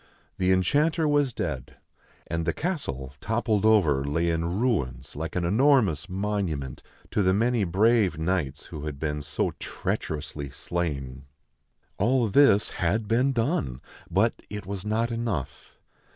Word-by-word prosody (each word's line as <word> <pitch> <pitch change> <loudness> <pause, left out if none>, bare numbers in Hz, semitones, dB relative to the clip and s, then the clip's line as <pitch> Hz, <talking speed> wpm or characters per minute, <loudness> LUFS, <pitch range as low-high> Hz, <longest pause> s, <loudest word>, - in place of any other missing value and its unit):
The 95 0 +3
enchanter 150 - +2
was 145 -3 +2
dead; 65 - -4 0.5
and 85 0 -2
the 85 - +2
castle, 70 - -3
toppled 110 -2 +1
over, 80 -11 +4
lay 80 +4 0
in 85 +2 -1
ruins 70 - -1
like 80 +3 -5
an 90 -1 0
enormous 105 - +3
monument 95 -9 -2 0.3
to - - +1
the 95 -1 +3
many 115 0 +2
brave 100 +1 +3
knights 80 -4 -1
who 75 -3 -7
had 75 -2 -5
been 75 -1 -2
so 75 +1 -1
treacherously 75 -2 -4
slain. 70 -5 -4 0.7
All 120 +3 +3
this 135 -4 +5
had 105 +5 +1
been 125 +5 +3
done, 115 - -1 0.3
but - - +1
it 105 -2 -6
was 100 0 -5
not 110 +3 0
enough. 115 - -4
95 Hz, 135 wpm, -26 LUFS, 75-115 Hz, 0.7 s, this